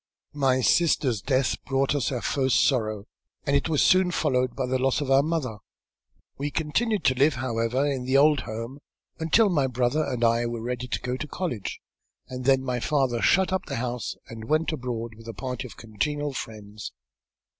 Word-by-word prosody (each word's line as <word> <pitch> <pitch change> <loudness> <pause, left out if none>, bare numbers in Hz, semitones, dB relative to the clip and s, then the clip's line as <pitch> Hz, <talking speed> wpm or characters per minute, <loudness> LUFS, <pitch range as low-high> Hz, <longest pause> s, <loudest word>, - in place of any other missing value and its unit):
My 135 -3 +2
sister's 135 - +2
death 130 +2 0
brought 135 0 +1
us 145 -2 0
our 125 -3 -3
first 135 -2 +2
sorrow, 110 -6 -1 0.4
and 140 - +1
it 140 - +1
was 155 -3 +3
soon 185 -1 +5
followed 125 -7 0
by 135 - -1
the 130 +1 0
loss 135 +2 +1
of 140 -2 -2
our 135 +1 +6
mother. 145 -7 -2 0.8
We 145 +1 -1
continued 195 +9 0
to 130 - +4
live, 140 +4 +3
however, 120 +1 0
in 135 -3 -1
the 130 +2 +3
old 150 +1 +5
home 115 +5 -6 0.4
until 185 +6 +3
my 145 -6 +2
brother 125 +4 +1
and 125 -5 -2
I 115 +1 +3
were 120 -1 -4
ready 125 +1 -3
to - - -3
go 125 0 -2
to 155 - -5
college, 145 - -4 0.5
and 125 0 -6
then 135 -1 +4
my 125 -2 -1
father 130 -3 0
shut 190 +1 +3
up 190 -1 -1
the - - -3
house 125 0 -3
and 110 -1 -8
went 155 +2 +2
abroad 120 -5 -4
with 115 +1 -14
a 115 - -6
party 125 -1 -4
of - - -14
congenial 140 +7 -3
friends. 105 -4 -7
130 Hz, 190 wpm, -26 LUFS, 120-145 Hz, 0.8 s, our